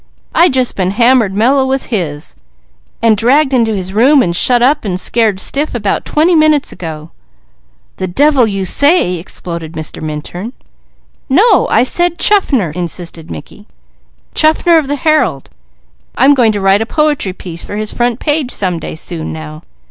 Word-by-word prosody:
"I 345 Hz, +1 st, +4 dB
just 260 Hz, -2 st, -1 dB
been 185 Hz, -2 st, -1 dB
hammered 235 Hz, 0 st, +2 dB
meller 260 Hz, +6 st, +2 dB
with 265 Hz, 0 st, -2 dB
his, 155 Hz, -7 st, -4 dB, 0.7 s
and 225 Hz, -2 st, +4 dB
dragged 265 Hz, +6 st, +2 dB
into 230 Hz, -4 st, +1 dB
his 190 Hz, -1 st, -5 dB
room, 260 Hz, +6 st, +4 dB
and 170 Hz, -1 st, -2 dB
shut 245 Hz, +5 st, +3 dB
up, 290 Hz, +4 st, +2 dB
and 185 Hz, -4 st, -3 dB
scared 220 Hz, -2 st, 0 dB
stiff, 280 Hz, +6 st, -1 dB
about 205 Hz, -4 st, -2 dB
twenty 320 Hz, +4 st, +2 dB
minutes 310 Hz, -3 st, +2 dB
ago." 160 Hz, -2 st, -8 dB, 0.9 s
"The 185 Hz, -, -3 dB
devil 270 Hz, +5 st, +2 dB
you 195 Hz, -2 st, -3 dB
say!" 285 Hz, -, +2 dB
exploded 170 Hz, -1 st, -7 dB
Mr. 155 Hz, -1 st, -5 dB
Minturn. 155 Hz, -, -6 dB, 0.8 s
"No, 390 Hz, -, +3 dB
I 230 Hz, -, +3 dB
said 345 Hz, +6 st, +1 dB
Chaffner!" 275 Hz, -, +2 dB
insisted 170 Hz, -1 st, -6 dB
Mickey. 80 Hz, -2 st, -11 dB, 0.7 s
"Chaffner 320 Hz, +2 st, +3 dB
of 295 Hz, -, -4 dB
the 290 Hz, -, -1 dB
Herald. 295 Hz, -, 0 dB, 0.6 s
I'm 270 Hz, +3 st, +4 dB
going 240 Hz, -5 st, +3 dB
to 205 Hz, -, -3 dB
write 195 Hz, +2 st, +3 dB
a 225 Hz, -, -2 dB
poetry 295 Hz, -11 st, 0 dB
piece 170 Hz, -2 st, -9 dB
for -, -, -7 dB
his 215 Hz, 0 st, -4 dB
front 240 Hz, 0 st, -1 dB
page, 295 Hz, -4 st, -1 dB
some 185 Hz, -8 st, -2 dB
day -, -, -7 dB
soon 160 Hz, 0 st, -5 dB
now. 155 Hz, -1 st, -9 dB
225 Hz, 165 wpm, -13 LUFS, 180-285 Hz, 0.9 s, I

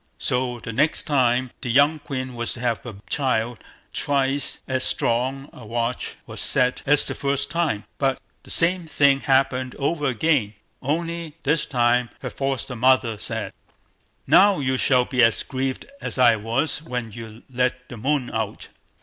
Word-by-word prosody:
So 125 Hz, -1 st, -1 dB
the 115 Hz, -, -6 dB
next 145 Hz, +7 st, +1 dB
time 125 Hz, -3 st, +1 dB
the 125 Hz, -, -4 dB
young 145 Hz, +6 st, +4 dB
queen 130 Hz, -3 st, -5 dB
was 120 Hz, -1 st, -3 dB
to -, -, -10 dB
have 120 Hz, -3 st, -1 dB
a 110 Hz, -, -7 dB
child, 120 Hz, -5 st, 0 dB, 0.3 s
twice 140 Hz, -1 st, 0 dB
as 130 Hz, -1 st, -1 dB
strong 130 Hz, +4 st, -1 dB
a 125 Hz, -, -12 dB
watch 115 Hz, +2 st, -3 dB
was -, -, -6 dB
set 125 Hz, 0 st, +1 dB
as 145 Hz, 0 st, +4 dB
the -, -, -3 dB
first 140 Hz, 0 st, -1 dB
time, 165 Hz, -11 st, 0 dB, 0.2 s
but 135 Hz, -2 st, +1 dB, 0.2 s
the -, -, -16 dB
same 175 Hz, 0 st, +3 dB
thing 140 Hz, -3 st, +3 dB
happened 130 Hz, -2 st, +1 dB
over 150 Hz, +1 st, -1 dB
again, 125 Hz, -4 st, +1 dB, 0.3 s
only 165 Hz, +2 st, -3 dB
this 150 Hz, +2 st, +1 dB
time 120 Hz, -1 st, +2 dB
her -, -, -5 dB
foster 135 Hz, -2 st, -3 dB
mother 120 Hz, -2 st, +3 dB
said: -, -, -3 dB, 0.7 s
"Now 200 Hz, -1 st, +6 dB
you 130 Hz, -2 st, 0 dB
shall 125 Hz, -1 st, +3 dB
be 125 Hz, -1 st, +1 dB
as 115 Hz, -1 st, +4 dB
grieved 130 Hz, 0 st, -3 dB, 0.2 s
as -, -, -3 dB
I 120 Hz, -3 st, +6 dB
was 115 Hz, +9 st, -1 dB
when 125 Hz, -8 st, -5 dB
you 115 Hz, +1 st, -10 dB
let 125 Hz, 0 st, -1 dB
the 125 Hz, -, -9 dB
moon 135 Hz, +2 st, -1 dB
out." 110 Hz, -2 st, -3 dB
130 Hz, 165 wpm, -23 LUFS, 120-140 Hz, 0.7 s, Now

